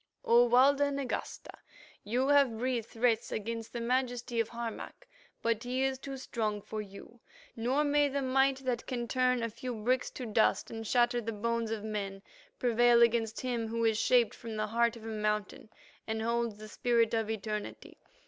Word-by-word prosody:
"O 240 +1 +6
Walda 280 +4 +5
Nagasta, 275 -2 -4 0.5
you 245 +6 0
have 280 -6 +4
breathed 240 -1 -1
threats 230 -1 0
against 225 +1 -4
the 240 - -4
Majesty 245 0 -1
of 225 - 0
Harmac, 235 -1 -7 0.4
but 230 -1 +1
he 255 +2 -1
is 265 -1 0
too 270 0 -6
strong 220 -5 -2
for 215 +1 -5
you, 205 +3 -12 0.4
nor 255 +6 +1
may 290 0 +3
the 280 0 -2
might 270 +1 +3
that 245 -2 -2
can 240 -2 -3
turn 250 -1 +1
a - - +1
few 240 +2 -5
bricks 245 +4 0
to 255 - -7
dust 220 -1 +1
and 225 -1 -6
shatter 240 0 +2
the 225 0 -3
bones 230 +1 -1
of 220 -2 -3
men 200 -2 -4 0.3
prevail 240 0 +4
against 230 -1 +1
him 240 -3 -2
who 230 +1 -1
is 220 -1 +2
shaped 240 -4 +3
from 230 -2 -8
the 215 0 -1
heart 235 +2 +1
of 230 - -12
a - - -6
mountain 210 -1 -2 0.4
and 220 0 -2
holds 235 -2 -1
the 215 0 -10
spirit 230 +1 +1
of 225 -1 0
eternity. 215 -1 -5
235 Hz, 180 wpm, -31 LUFS, 220-250 Hz, 0.5 s, O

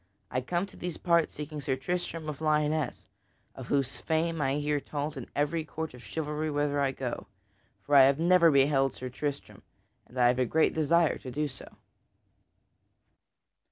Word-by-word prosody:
I 130 - 0
come 175 +8 -1
to 200 - -14
these 175 -2 -5
parts 170 -2 +2
seeking 150 0 -6
Sir 135 -1 0
Tristram 165 +3 -3
of 150 0 -5
Lyonesse, 150 -9 0 0.5
of 130 -2 -9
whose 135 -2 0
fame 160 0 -1
I 135 0 +1
hear 150 0 0
told 145 +1 -4
in 130 -3 -7
every 150 +3 0
court 160 -1 -5
of 125 - -12
chivalry 155 0 -3
whither 145 -1 0
I 135 -1 +2
go. 130 -2 -5 0.6
For 145 - -3
I 135 -2 +9
have 135 0 +3
never 170 +1 +5
beheld 135 -1 +3
Sir 130 - -6
Tristram, 140 +2 -5 0.5
and 125 - -13
I 125 -1 +5
have 125 +1 +1
a 130 - +3
great 160 +6 +2
desire 160 +1 +2
to 130 - -8
do 150 +4 -1
so." 130 - -11
150 Hz, 175 wpm, -29 LUFS, 135-160 Hz, 0.6 s, I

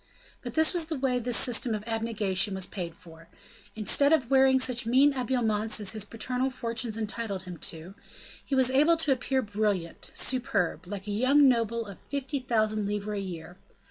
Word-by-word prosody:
But 245 -2 -7
this 315 +2 +4
was 345 -3 +1
the 315 -1 -4
way 255 -2 0
this 245 0 +1
system 240 -2 +2
of 210 - -6
abnegation 215 -4 0
was 190 -1 0
paid 175 -5 -6
for: 165 -3 -16 0.5
instead 225 +7 +3
of 275 -6 +2
wearing 265 0 +5
such 250 -3 +1
mean 265 +5 +5
habiliments 225 -5 0
as 200 -2 +1
his 215 -2 -2
paternal 250 +4 -2
fortunes 230 -3 -1
entitled 215 -3 -4
him 180 -2 -8
to, 165 +3 -10 0.5
he 275 - -2
was 260 -1 +3
able 300 +5 +4
to 315 -3 0
appear 265 0 0
brilliant, 205 -5 -3
superb, 210 - -1
like 195 0 -6
a 210 - -4
young 265 +7 +4
noble 230 -2 +1
of 200 -2 -11
fifty 280 0 -4
thousand 215 -4 0
livres 205 0 -3
a - - -3
year. 175 -2 -8
225 Hz, 180 wpm, -28 LUFS, 205-260 Hz, 0.5 s, wearing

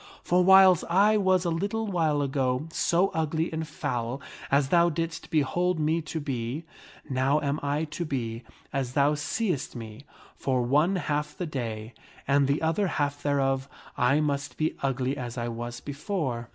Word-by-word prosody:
For 180 +1 +3
whiles 190 -2 +7
I 200 +5 +4
was 185 -2 +2
a 170 - +1
little 205 +7 -1
while 160 -7 +1
ago 135 +1 0
so 180 +3 +2
ugly 160 +1 -1
and 160 0 -3
foul 125 -4 -3 0.3
as 140 0 +2
thou 170 +1 +5
didst 165 0 -4
behold 170 +4 +1
me 155 +2 +1
to 160 +1 -5
be, 135 0 -3 0.4
now 135 +2 +2
am 145 +1 -1
I 145 +2 0
to 160 +2 -4
be 120 -7 -3 0.3
as 135 -2 -2
thou 145 +2 +3
seest 155 - -2
me, 115 +2 -9 0.3
for 130 -2 0
one 150 +10 +3
half 150 -4 -2
the 180 - -2
day 115 -6 -5 0.3
and 140 0 +3
the 140 +3 0
other 165 +5 +1
half 145 -3 -1
thereof 135 -1 0 0.3
I 140 +5 +3
must 145 -1 -2
be 155 0 0
ugly 135 0 0
as 120 -2 -5
I 120 0 -2
was 120 +1 -5
before." 140 - -3
145 Hz, 165 wpm, -27 LUFS, 130-165 Hz, 0.4 s, whiles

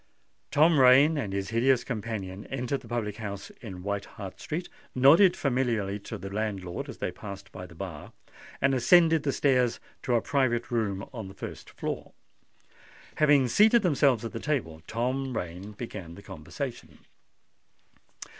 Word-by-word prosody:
Tom 155 +1 +4
Rain 135 +5 +7
and 125 -10 -2
his 100 0 -3
hideous 120 +2 +3
companion 105 -4 -5
entered 135 +1 -2
the - - -14
public 110 -4 -3
house 100 -3 -6
in 95 -6 -8
White 100 0 -2
Hart 95 -3 -9
Street, 170 +3 -4 0.3
nodded 165 +9 +6
familiarly 120 - 0
to 105 +2 -7
the 95 0 -8
landlord 100 -4 -3
as - - -8
they - - -2
passed 100 -2 -9
by 90 - -8
the 85 - -15
bar, 85 -4 -7 0.5
and 140 - +3
ascended 160 +5 +5
the 145 - 0
stairs 125 -4 +2 0.2
to 125 - 0
a - - +4
private 125 -4 0
room 100 -5 -1
on 110 -6 -6
the 95 - -11
first - - -8
floor. - - -5 1.0
Having 145 -4 +4
seated 220 - +5
themselves 140 - +3
at 115 - -4
the - - -5
table, 110 - -2
Tom 130 +2 -2
Rain 90 +4 -6
began 100 -6 -7
the 100 - -13
conversation. 110 - -7
115 Hz, 155 wpm, -28 LUFS, 100-135 Hz, 1.0 s, Rain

